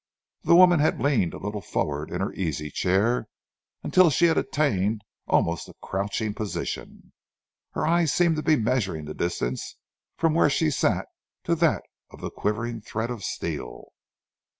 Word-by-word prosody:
The - - +4
woman 180 -2 +7
had 150 - +2
leaned 120 - +1
a - - -6
little 105 +1 -4
forward 75 -4 -2
in - - -3
her - - -2
easy 75 -4 -3
chair 105 - +1 0.6
until 185 -2 +5
she 170 +4 +3
had 165 -1 +4
attained 110 -8 0 0.2
almost 85 0 +1
a - - -14
crouching 100 +2 -2
position. 105 -1 -5 0.6
Her - - -1
eyes 165 -1 +3
seemed 170 -3 +3
to - - 0
be 155 0 +4
measuring 110 - -1
the 75 - -6
distance 70 -8 -3 0.4
from 165 -1 +2
where 165 -2 +4
she 155 +2 +1
sat - - +1 0.4
to 170 - +1
that 165 -2 +2 0.5
quivering 115 +2 -2
thread 110 +2 -3
of 115 -5 -6
steel. - - -5
115 Hz, 150 wpm, -25 LUFS, 95-155 Hz, 0.6 s, woman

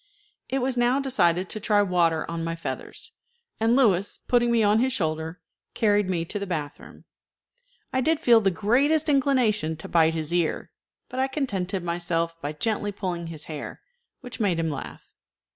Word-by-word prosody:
It 265 0 -1
was 255 -1 -1
now 245 +3 +3
decided 185 -10 +1
to 215 - -5
try 205 -1 +3
water 170 -4 +1
on 165 0 -4
my 165 0 -2
feathers, 165 - -7 0.5
and 225 +2 +3
Louis, 205 -7 +3
putting 240 -1 +3
me 230 -2 +3
on 210 +1 +4
his 260 +2 +2
shoulder, 160 -3 -2 0.4
carried 205 -3 +2
me 170 -3 -1
to 205 +5 -4
the 200 - -4
bath 155 -4 -4
room. - - -15 0.9
I 260 - +2
did 315 +3 +2
feel 235 -7 +5
the 195 - +3
greatest 270 - +2
inclination 245 - +2
to 160 - -8
bite 165 -1 +3
his 160 +1 -3
ear, 175 -2 -1 0.4
but 255 - -6
I 265 - +2
contented 200 - -2
myself 170 -1 -1
by 145 - -3
gently 205 +6 -2
pulling 180 -4 -4
his 160 -2 -7
hair, 150 -3 -7 0.4
which 245 -3 -9
made 195 -6 +1
him 165 -1 -1
laugh. 140 - -7
200 Hz, 175 wpm, -25 LUFS, 165-240 Hz, 0.9 s, feel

